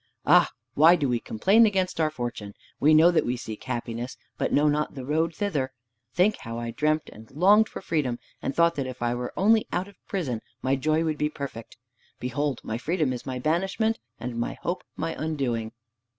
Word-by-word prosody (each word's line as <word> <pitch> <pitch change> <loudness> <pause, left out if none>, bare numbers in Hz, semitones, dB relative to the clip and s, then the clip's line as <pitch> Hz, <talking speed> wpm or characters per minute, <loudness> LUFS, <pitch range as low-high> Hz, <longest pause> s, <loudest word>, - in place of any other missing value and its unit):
Ah, - - +6 0.2
why 160 +4 +7
do 145 -5 0
we 120 -2 +1
complain 200 - +4
against 190 -4 -1
our 155 -1 +3
fortune? 120 -7 -5 0.2
We 155 +2 +5
know 165 +3 +7
that 170 - +3
we 125 +1 -1
seek 110 -3 -7
happiness, 120 0 -4 0.2
but - - -1
know 150 +1 +4
not 150 0 0
the 130 -2 -6
road 160 +3 0
thither! 145 -10 -1 0.4
Think 185 - +3
how 115 0 -7
I 120 0 -4
dreamt 155 +5 0
and 110 +1 -14
longed 205 +9 +5
for - - -7
freedom, 140 -7 0 0.2
and 135 - -3
thought 170 0 +4
that 135 -2 -1
if 130 -1 -6
I 120 0 +1
were 125 0 -4
only 220 +4 +4
out 180 +2 -1
of 200 -2 -18
prison 135 - -2 0.2
my 130 +1 +1
joy 155 +4 +1
would 155 -2 -1
be 150 - +1
perfect. 140 -7 -7 0.4
Behold, 130 +2 -2
my 110 +1 -3
freedom 155 -1 0
is 125 - -7
my 130 -1 -3
banishment, 190 - 0 0.2
and 120 -1 -4
my 120 - -2
hope 175 +2 -2
my 165 - -2
undoing!" 125 -8 -2
150 Hz, 200 wpm, -26 LUFS, 125-170 Hz, 0.4 s, why